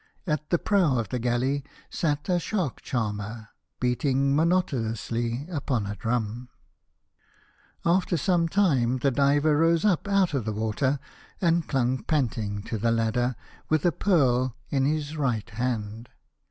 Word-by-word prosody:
At 150 Hz, -3 st, -2 dB
the 175 Hz, -, +3 dB
prow 175 Hz, -9 st, +2 dB
of 110 Hz, -4 st, -2 dB
the 125 Hz, -, -2 dB
galley 125 Hz, +4 st, 0 dB, 0.3 s
sat 145 Hz, -3 st, -1 dB
a 180 Hz, -2 st, +2 dB
shark 175 Hz, -, -2 dB
charmer, 105 Hz, -2 st, -3 dB, 0.3 s
beating 135 Hz, +2 st, +1 dB
monotonously 120 Hz, -7 st, 0 dB
upon 140 Hz, -, -2 dB
a 105 Hz, +1 st, -4 dB
drum. 115 Hz, +1 st, 0 dB
The 105 Hz, +3 st, -7 dB
Young 125 Hz, +1 st, -11 dB, 1.4 s
King. 170 Hz, -, +3 dB
After 180 Hz, -2 st, -2 dB
some 170 Hz, +1 st, +2 dB
time 135 Hz, -11 st, +2 dB
the 135 Hz, +2 st, +1 dB
diver 145 Hz, +3 st, +3 dB
rose 165 Hz, +3 st, +3 dB
up 200 Hz, -1 st, +2 dB
out 195 Hz, -4 st, +2 dB
of 130 Hz, -6 st, -1 dB
the 110 Hz, -, -2 dB
water, 110 Hz, +6 st, 0 dB, 0.4 s
and 170 Hz, -2 st, +2 dB
clung 130 Hz, -2 st, 0 dB
panting 110 Hz, -8 st, -1 dB
to 110 Hz, 0 st, -4 dB
the 115 Hz, +3 st, +1 dB
ladder 115 Hz, +2 st, +1 dB, 0.3 s
with 155 Hz, 0 st, +2 dB
a 175 Hz, -, +5 dB
pearl 130 Hz, -, +2 dB, 0.2 s
in 135 Hz, -2 st, +2 dB
his 150 Hz, +1 st, -1 dB
right 120 Hz, -7 st, 0 dB
hand. 115 Hz, -1 st, -3 dB
130 Hz, 155 wpm, -26 LUFS, 115-155 Hz, 1.4 s, a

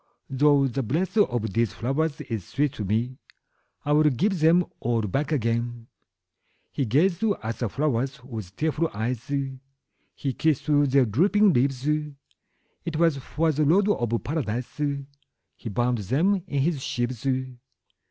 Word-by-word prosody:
Though 140 Hz, +1 st, +4 dB
the 135 Hz, +2 st, -2 dB
breath 160 Hz, -, -1 dB
of 120 Hz, -, +1 dB
these 115 Hz, -1 st, +1 dB
flowers 145 Hz, +5 st, -1 dB
is 110 Hz, -5 st, -4 dB
sweet 145 Hz, -1 st, 0 dB
to 105 Hz, -, -5 dB
me, 115 Hz, +6 st, -1 dB, 0.7 s
I 145 Hz, -, 0 dB
will 150 Hz, +1 st, +5 dB
give 185 Hz, -, 0 dB
them 165 Hz, +3 st, +4 dB
all 115 Hz, -1 st, 0 dB
back 135 Hz, -, -1 dB
again.'' 120 Hz, -3 st, -1 dB, 0.9 s
He 140 Hz, -, -1 dB
gazed 170 Hz, -, +2 dB, 0.2 s
at 115 Hz, +1 st, -4 dB
the 120 Hz, -, -1 dB
flowers 135 Hz, 0 st, -1 dB
with 110 Hz, -7 st, -8 dB
tearful 160 Hz, +1 st, 0 dB
eyes, 120 Hz, +4 st, -3 dB, 0.8 s
He 135 Hz, -3 st, -2 dB
kissed 155 Hz, 0 st, +1 dB
their 145 Hz, -3 st, +4 dB
drooping 195 Hz, -, +3 dB
leaves; 135 Hz, +1 st, +1 dB
It 150 Hz, +2 st, -6 dB
was 165 Hz, -3 st, +3 dB
for 160 Hz, +4 st, 0 dB
the 155 Hz, +1 st, 0 dB
Lord 190 Hz, +8 st, +4 dB
of 120 Hz, -, 0 dB
Paradise 125 Hz, -2 st, -3 dB, 0.7 s
He 115 Hz, -, -7 dB
bound 120 Hz, +2 st, 0 dB
them 160 Hz, -, +1 dB
in 140 Hz, -5 st, 0 dB
his 155 Hz, -3 st, 0 dB
sheaves. 120 Hz, +1 st, -3 dB
135 Hz, 140 wpm, -25 LUFS, 120-155 Hz, 0.9 s, will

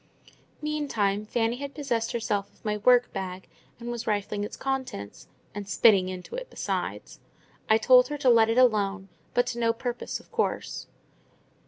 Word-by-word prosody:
Meantime, 220 Hz, -10 st, -1 dB
Fanny 230 Hz, +1 st, 0 dB
had 280 Hz, +1 st, -6 dB
possessed 240 Hz, -6 st, -1 dB
herself 215 Hz, -4 st, -2 dB
of -, -, -29 dB
my 210 Hz, 0 st, 0 dB
work 245 Hz, +3 st, +4 dB
bag, 185 Hz, -1 st, -5 dB, 0.3 s
and 240 Hz, 0 st, -5 dB
was 235 Hz, -1 st, -5 dB
rifling 205 Hz, -1 st, -1 dB
its 210 Hz, -, -6 dB
contents—and 205 Hz, -, -6 dB
spitting 195 Hz, -3 st, +5 dB
into 185 Hz, -1 st, -8 dB
it -, -, -5 dB
besides. -, -, -4 dB, 0.5 s
I 220 Hz, -, +6 dB
told 250 Hz, +3 st, +6 dB
her 295 Hz, -, -4 dB
to 270 Hz, -3 st, +2 dB
let 225 Hz, -1 st, +5 dB
it 225 Hz, -, +1 dB
alone, 205 Hz, -5 st, +2 dB, 0.3 s
but 245 Hz, -, +4 dB
to 240 Hz, -, -6 dB
no 230 Hz, -1 st, +2 dB
purpose, 240 Hz, +1 st, -4 dB
of -, -, -21 dB
course. 460 Hz, -1 st, -2 dB
230 Hz, 160 wpm, -27 LUFS, 205-250 Hz, 0.5 s, I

